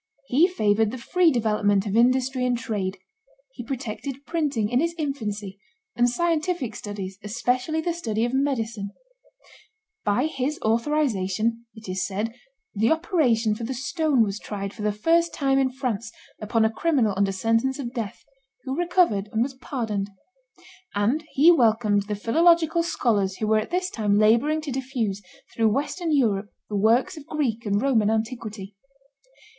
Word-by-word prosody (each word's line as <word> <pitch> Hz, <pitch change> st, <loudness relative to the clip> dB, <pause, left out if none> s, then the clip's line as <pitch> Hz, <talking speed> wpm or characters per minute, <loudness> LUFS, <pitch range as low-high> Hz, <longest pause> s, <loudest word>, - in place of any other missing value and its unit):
He 305 Hz, +8 st, +5 dB
favored 215 Hz, -, +2 dB
the 255 Hz, -, -6 dB
free 350 Hz, +8 st, +3 dB
development 210 Hz, -5 st, +1 dB
of 205 Hz, 0 st, -2 dB
industry 255 Hz, +2 st, +3 dB
and 250 Hz, -1 st, +1 dB
trade; 205 Hz, -4 st, -3 dB, 0.5 s
he 245 Hz, -, -8 dB
protected 265 Hz, +2 st, -5 dB
printing, 290 Hz, -10 st, 0 dB
in 245 Hz, +3 st, +2 dB
its 335 Hz, +1 st, -1 dB
infancy, 210 Hz, -, -4 dB, 0.4 s
and 240 Hz, 0 st, +3 dB
scientific 320 Hz, -4 st, -1 dB
studies, 195 Hz, -2 st, -6 dB
especially 250 Hz, +8 st, -1 dB
the 345 Hz, +1 st, -1 dB
study 225 Hz, -9 st, -1 dB
of 240 Hz, -, -3 dB
medicine; 230 Hz, -7 st, -1 dB, 1.1 s
by 225 Hz, +7 st, +1 dB
his 295 Hz, -1 st, -2 dB
authorization, 230 Hz, -3 st, 0 dB
it 220 Hz, -1 st, -12 dB
is 185 Hz, 0 st, -2 dB
said, 210 Hz, +4 st, -3 dB, 0.4 s
the 220 Hz, +2 st, +2 dB
operation 275 Hz, -, +2 dB
for 215 Hz, -, -6 dB
the 260 Hz, +3 st, -3 dB
stone 285 Hz, -1 st, +1 dB
was 205 Hz, -1 st, -3 dB
tried, 200 Hz, -1 st, -5 dB
for 235 Hz, -, -9 dB
the 210 Hz, 0 st, +1 dB
first 330 Hz, +11 st, +2 dB
time 270 Hz, -2 st, +2 dB
in 265 Hz, -1 st, +2 dB
France, 240 Hz, -4 st, -3 dB, 0.3 s
upon 220 Hz, +1 st, +1 dB
a 220 Hz, -, +2 dB
criminal 250 Hz, -6 st, +1 dB
under 195 Hz, 0 st, +1 dB
sentence 225 Hz, +7 st, +1 dB
of 250 Hz, -4 st, -5 dB
death, 225 Hz, -6 st, -5 dB, 0.4 s
who 265 Hz, -1 st, -3 dB
recovered, 340 Hz, -, +2 dB
and 225 Hz, +1 st, +2 dB
was 270 Hz, +2 st, -4 dB
pardoned; 225 Hz, -6 st, -3 dB, 0.9 s
and 235 Hz, +10 st, +1 dB
he 310 Hz, +6 st, +7 dB
welcomed 220 Hz, -, +3 dB
the 210 Hz, -, -2 dB
philological 330 Hz, -, +3 dB
scholars 210 Hz, -, 0 dB
who 215 Hz, -, -2 dB
were 215 Hz, 0 st, +3 dB
at 215 Hz, -, -4 dB
this 365 Hz, +1 st, -1 dB
time 205 Hz, -2 st, +1 dB
laboring 235 Hz, +9 st, +3 dB
to 300 Hz, -2 st, -5 dB
diffuse 250 Hz, -6 st, -2 dB, 0.3 s
through 225 Hz, -1 st, +2 dB
Western 290 Hz, -, -1 dB
Europe 215 Hz, -8 st, +1 dB, 0.2 s
the 210 Hz, -, -3 dB
works 235 Hz, -, +2 dB
of 290 Hz, -, -11 dB
Greek 235 Hz, -8 st, -2 dB
and 205 Hz, +2 st, +1 dB
Roman 230 Hz, -7 st, +3 dB
antiquity. 220 Hz, -3 st, -3 dB
235 Hz, 160 wpm, -24 LUFS, 210-280 Hz, 1.1 s, he